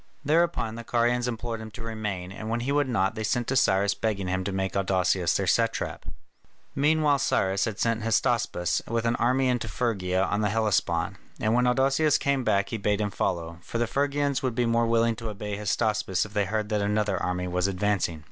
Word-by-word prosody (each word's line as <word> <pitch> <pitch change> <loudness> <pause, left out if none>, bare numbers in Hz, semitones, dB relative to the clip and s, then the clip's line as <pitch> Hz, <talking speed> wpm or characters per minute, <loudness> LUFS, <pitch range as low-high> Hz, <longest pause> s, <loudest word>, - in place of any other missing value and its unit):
Thereupon 160 -6 +1
the 115 +1 -7
Carians 120 +1 +1
implored 115 -1 -4
him 110 - -7
to 115 - -7
remain, 105 -5 -4
and 110 +3 -6
when 115 +1 -1
he 130 +4 -1
would 145 -2 +1
not, 110 -3 +1
they 110 -1 -4
sent 120 +3 0
to 135 - 0
Cyrus 100 -5 +3
begging 100 -3 -2
him 95 +1 -1
to 100 - -2
make 95 0 -2
Adousius 95 -2 +1
their 100 - -1
satrap. 115 +5 0 0.7
Meanwhile 150 0 +3
Cyrus 95 -6 +1
had 110 -3 -4
sent 115 -1 +1
Hystaspas 115 -5 +1
with 115 0 -1
an 115 +1 +2
army 130 +2 +2
into 125 -2 0
Phrygia 95 -5 0
on 105 +2 0
the 105 - +1
Hellespont, 95 -4 0 0.2
and 110 +1 +1
when 125 +1 +3
Adousius 135 +4 +3
came 140 -2 0
back 100 -3 +1
he 115 - -3
bade 105 0 0
him 105 -1 -1
follow, 85 -3 -2
for 105 - -5
the 120 - +1
Phrygians 140 +2 0
would 130 -3 -2
be 120 0 +1
more 115 0 +2
willing 115 0 +2
to 115 -1 -5
obey 105 0 -5
Hystaspas 105 -2 0
if 105 - -12
they 105 -2 +1
heard 105 +1 -2
that 105 -2 0
another 105 -2 0
army 90 0 -2
was 90 +1 0
advancing. 95 -4 0
110 Hz, 205 wpm, -26 LUFS, 95-120 Hz, 0.7 s, Cyrus